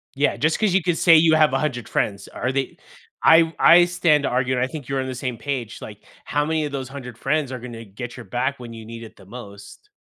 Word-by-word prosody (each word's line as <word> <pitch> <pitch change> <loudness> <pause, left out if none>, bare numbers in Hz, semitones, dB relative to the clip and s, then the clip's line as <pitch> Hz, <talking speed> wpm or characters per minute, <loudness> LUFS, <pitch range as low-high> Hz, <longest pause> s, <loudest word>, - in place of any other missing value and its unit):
Yeah, 140 +2 +1
just 160 +2 0
'cause 215 -4 +1
you 190 - +3
could 175 -1 -1
say 165 - +6
you 160 0 +4
have 155 -3 +4
100 135 -4 -2
friends, 100 -1 -2
are 130 - -3
they 135 0 -3 0.5
I 165 0 +5
I 175 +1 +7
stand 175 -4 +2
to - - 0
argue 130 +1 0
and 125 - 0
I - - 0
think 145 -2 -8
you're 135 -1 -1
on 130 - -5
the 130 - -4
same 125 -1 -4
page, 120 -2 -5
like, 105 -1 -10 0.2
how 145 0 0
many 160 0 -1
of 145 - -5
those 135 -2 -4
100 125 -4 -9
friends 140 +1 -1
are 130 - -5
gonna 115 -1 -9
get 115 +5 -9
your 125 - -8
back 130 +7 -2
when 120 -2 -9
you 115 -1 -10
need 115 +1 -9
it 110 - -12
the 95 - -16
most? 100 - -12
130 Hz, 255 wpm, -22 LUFS, 120-155 Hz, 0.5 s, I